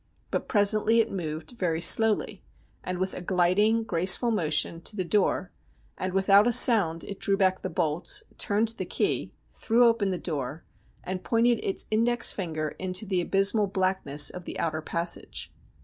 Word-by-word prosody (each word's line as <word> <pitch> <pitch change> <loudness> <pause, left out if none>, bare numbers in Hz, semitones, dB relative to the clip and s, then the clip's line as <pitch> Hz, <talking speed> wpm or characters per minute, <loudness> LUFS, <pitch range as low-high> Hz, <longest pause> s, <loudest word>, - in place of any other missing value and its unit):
But - - -3
presently 215 +1 +2
it 225 - 0
moved 160 -2 -6
very 180 -9 -2
slowly, 220 +4 +2 0.4
and 185 0 -4
with 185 +1 -3
a - - -7
gliding, 190 +5 +1
graceful 185 +5 +4
motion, 165 -4 0
to 210 - -3
the 185 -3 -2
door, 190 0 -1 0.4
and 185 - -4
without 195 +3 +3
a - - +2
sound 195 -9 +5
it 200 - -9
drew 195 0 +1
back 190 -1 +1
the - - -5
bolts, 165 0 0 0.2
turned 210 +2 0
the 230 - -5
key, - - -2 0.2
threw 240 +2 +1
open 230 -4 +1
the 185 - -2
door, 145 0 -5 0.4
and 185 0 -6
pointed 235 0 +1
its 195 - -3
index 230 +2 +1
finger 155 -5 -4
into 185 +2 -3
the 185 -3 -1
abysmal 200 +3 +2
blackness 185 -7 -1
of 180 -1 -10
the - - -7
outer 160 -1 -3
passage. 170 +2 -3
190 Hz, 165 wpm, -26 LUFS, 170-215 Hz, 0.4 s, sound